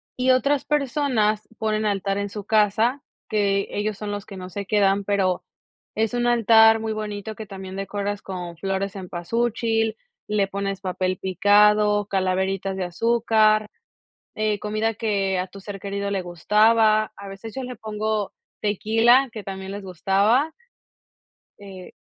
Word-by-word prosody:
y 255 +1 +2
otras 280 +2 +2
personas 260 -7 0
ponen 215 0 0
altar 195 -1 0
en 200 0 -2
su 205 +1 -7
casa, 220 +5 +2 0.3
que 200 -2 +1
ellos 205 0 -2
son 210 -1 -5
los 205 0 -5
que 195 - -10
no 185 0 -7
se 200 +2 -5
quedan, 200 -1 +2
pero 185 -3 0 0.5
es 220 +1 0
un 240 0 0
altar 225 -1 +6
muy 220 0 -3
bonito 215 0 -5
que 220 - -7
también 190 -1 -8
decoras 200 +1 -3
con 175 -3 -6
flor 195 +2 -2
de 195 - -1
cempasúchil, 225 +4 -1 0.3
le 210 -2 +1
pones 195 0 -4
papel 185 -1 -2
picado, 205 +2 +4
calaveritas 190 0 -1
de 190 - -2
azúcar, 215 +1 +2 0.7
eh, 215 -1 0
comida 215 +1 -1
que 200 -4 0
a 180 - -2
tu 195 +1 -12
ser 195 0 -7
querido 200 0 -3
le 195 -1 -1
gustaba, 215 +5 +3
a 200 0 -10
veces 200 +3 -9
yo 265 - -4
le 250 0 -6
pongo 215 -1 -3 0.3
tequila, 225 +5 +3
que 215 -2 -7
también 190 0 -6
les 200 0 -6
gustaba. 200 - +1 1.1
Eh 190 -3 -11
205 Hz, 150 wpm, -23 LUFS, 195-220 Hz, 1.1 s, altar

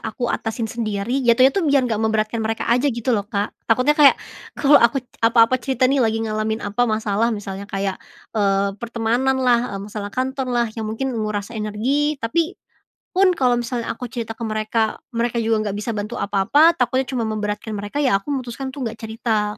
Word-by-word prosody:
aku 230 +2 -4
atasin 225 +1 -3
sendiri 225 +2 -2
jatuhnya 255 +3 +6
itu 390 - 0
biar 275 -2 +4
gak 225 -3 -1
memberatkan 220 0 0
mereka 220 0 -2
aja 250 +4 +2
gitu 240 0 -1
loh, 205 -3 +1
Kak, 205 -1 -2 0.2
takutnya 255 +6 +4
kayak 295 -2 +6 0.4
kalau 290 0 +6
aku 235 +3 +4 0.2
apa-apa 230 +2 +4
cerita 260 0 0
nih 270 +1 +3
lagi 225 -2 +2
ngalamin 215 0 -2
apa 210 +4 +1
masalah 215 +1 +1
misalnya 200 -1 -6
kayak, 195 -1 -2 0.3
eee, 200 -2 +1
pertemananlah, 240 +1 +1
eee, - - -6
masalah 205 0 -6
kantorlah 255 -3 -1
yang 220 - -3
mungkin 265 +5 -2
menguras 215 -3 -3
energi 235 +7 -1
tapi, 330 +10 0 0.6
pun 370 0 +3
kalau 255 -7 +2
misalnya 240 0 -3
aku 250 - -4
cerita 225 -1 -5
ke 230 - -4
mereka 215 +1 -1 0.2
mereka 235 0 0
juga 220 -1 +1
nggak 200 - -2
bisa 230 - -4
bantu 210 +3 -4
apa-apa 240 - +3
takutnya 260 -5 0
cuma 245 -4 -1
memberatkan 215 0 -3
mereka 205 +5 -5
ya 280 -6 +2
aku 245 - -10
memutuskan 265 -1 -3
tuh 265 -1 -5
nggak 225 0 -4
cerita 220 -1 -1
230 Hz, 180 wpm, -21 LUFS, 215-255 Hz, 0.6 s, jatuhnya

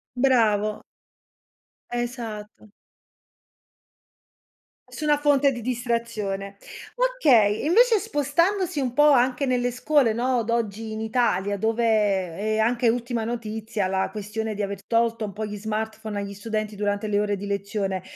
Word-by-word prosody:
Bravo. 220 -5 +2 1.1
Esatto. 230 -4 -5 2.2
Nessuna 300 -1 +1
fonte 285 -1 +3
di 240 - -6
distrazione. 230 -5 -3 0.4
Okay, 290 - +3
invece 450 +5 +5
spostandosi 340 -1 0
un 250 -2 -2
po' 295 +1 +6
anche 260 +1 +3
nelle 245 -1 +1
scuole, 250 -2 +2
no, 245 +1 +1
d'oggi 225 -1 -2
in 220 - -5
Italia, 205 -4 0
dove 225 +3 0
è 205 -1 +1
anche 235 +2 +2
ultima 235 -1 -1
notizia 220 -2 -3
la 190 0 0
questione 215 +1 -4
di 205 - -3
aver 200 -1 -4
tolto 230 -1 +1
un 200 - -9
po' 215 +1 -4
gli 210 0 -5
smartphone 220 0 -4
agli 200 0 -5
studenti 215 +1 -4
durante 205 +1 -1
le 205 -1 +1
ore 205 -1 0
di 200 +1 -7
lezione, 200 -2 -2
225 Hz, 130 wpm, -24 LUFS, 210-250 Hz, 2.2 s, po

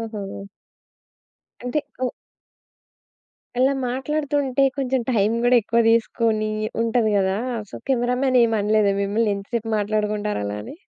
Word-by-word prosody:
ఓహో! 210 -3 -6 1.2
అంటే 250 +5 -1 0.3
ఒ - - +2 1.5
అలా 265 +2 +4
మాట్లాడుతూంటే 275 +1 -1
కొంచెం 265 -1 0
టైమ్ 215 -1 +2
గూడా 245 0 +5
ఎక్కువ 235 +2 +1
దీసుకొని 225 -1 +1 0.3
ఉంటది 230 -1 +1
గదా! 190 0 +1 0.3
సో - - -11 0.2
కెమెరా 245 -1 +1
మ్యాన్ 255 -2 +3
ఏమనలేదా 215 -2 +2
మిమ్మల్ని 210 +1 +1
ఎంత 200 0 -7
సేపు 225 -1 -4
మాట్లాడుకుంటారు 210 - -1
అలా 100 0 -3
అని? - - -9
225 Hz, 120 wpm, -22 LUFS, 210-250 Hz, 1.5 s, గూడా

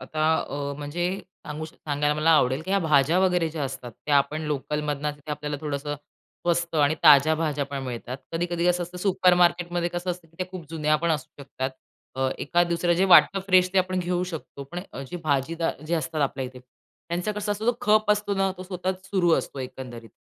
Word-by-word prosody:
आता 155 0 -2 0.2
अ, 140 0 -3
म्हणजे 155 +5 -2 0.4
सांगू 150 +1 -5
सांगायला 150 -1 -1
मला 155 +2 +2
आवडेल 130 -3 +4
की 185 - -6
ह्या 195 - +3
भाज्या 155 +1 +3
वगैरे 180 -3 +2
ज्या 155 -3 -3
असतात, 130 -2 -6
त्या 145 - +4
आपण 140 +3 +1
लोकलमधनं 150 0 -2
तिथे 145 +1 -11
आपल्याला 150 0 -3
थोडंसं 145 -1 -3
स्वस्त 170 +3 -4
आणि 145 0 +4
ताज्या 150 +1 +8
भाज्या 150 -3 -1
पण 140 -1 -5
मिळतात. 125 0 -5 0.2
कधी-कधी 175 +1 -1
कसं 180 0 +2
असतं 175 +1 -8
सुपरमार्केटमध्ये 175 -2 +3
कसं 175 +1 -3
असतं 175 -2 -7
की 165 - -27
त्या 185 - -2
खूप 185 -3 -7
जुन्या 155 -1 +2
पण 170 - +2
असू 145 -2 -3
शकतात. 130 -1 -4 0.5
अ, 130 0 +1
एखाद-दुसरं 175 +2 +1
जे 185 +3 +3
वाटतं 195 - +7
फ्रेश 185 -1 +5
ते 195 - +3
आपण 185 0 +1
घेऊ 180 0 0
शकतो. 140 -3 -7
पण 175 - -3
अ, 135 - -6
जे - - -4
भाजीदार 155 +2 0
जे 170 - 0
असतात 155 -1 -2
आपल्या 135 -1 -1
इथे, 125 0 -11
त्यांचा 170 +9 -6
कसा 210 0 -2
असतो 215 +2 -5
तो 240 - -7
खप 215 0 +3
असतो 210 -1 +1
ना 195 0 +1
तो - - -5
सतत 185 0 -4
सुरू 185 -4 +2
असतो 140 - -6
एकंदरीत 125 -3 -8
160 Hz, 200 wpm, -25 LUFS, 145-180 Hz, 0.5 s, ताज्या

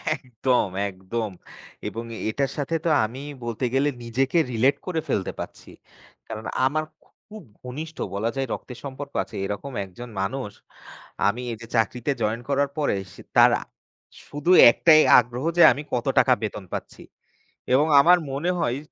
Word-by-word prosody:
একদম, 125 -4 0 0.2
একদম। 100 +4 -4 0.6
এবং 115 - -5
এ - - -7
এটার 135 +4 -1
সাথে 150 +3 -2
তো - - +3 0.2
আমি 120 +5 -7 0.2
বলতে 120 +2 -3
গেলে 140 +2 +2
নিজেকে 130 +6 0
relate 125 +4 +2
করে 170 -3 -1
ফেলতে 95 - -1
পাচ্ছি। - - -8 0.6
কারণ 110 0 -7 0.2
আমার 155 +4 +1 0.5
খুব 215 -2 -10 0.2
ঘনিষ্ঠ 155 +6 -7 0.2
বলা 105 +3 -1
যায় 135 -1 -2
রক্তের 125 - -8
সম্পর্ক 140 0 -7
আছে, - - -13
এরকম 105 +8 -5
একজন 120 +6 -10
মানুষ 105 +2 -3 0.8
আমি 110 +5 0
এইযে 115 +1 -8
চাকরিতে 120 +4 0
জয়েন 110 +3 -1
করার 140 0 +1
পরে 150 -8 +1 0.2
সে - - -13 0.2
তারা - - +6 0.7
শুধু 145 +5 -1 0.2
একটাই 155 +4 +6 0.2
আগ্রহ 125 +3 -4
যে - - +6
আমি 145 - -3
কত 120 - -1
টাকা 130 - +5
বেতন 105 -2 -4
পাচ্ছি। - - -6 0.7
এবং 145 +4 +4
আমার 175 +5 +6
মনে 145 +6 -2
হয় 120 -5 0
130 Hz, 150 wpm, -24 LUFS, 115-145 Hz, 0.8 s, তারা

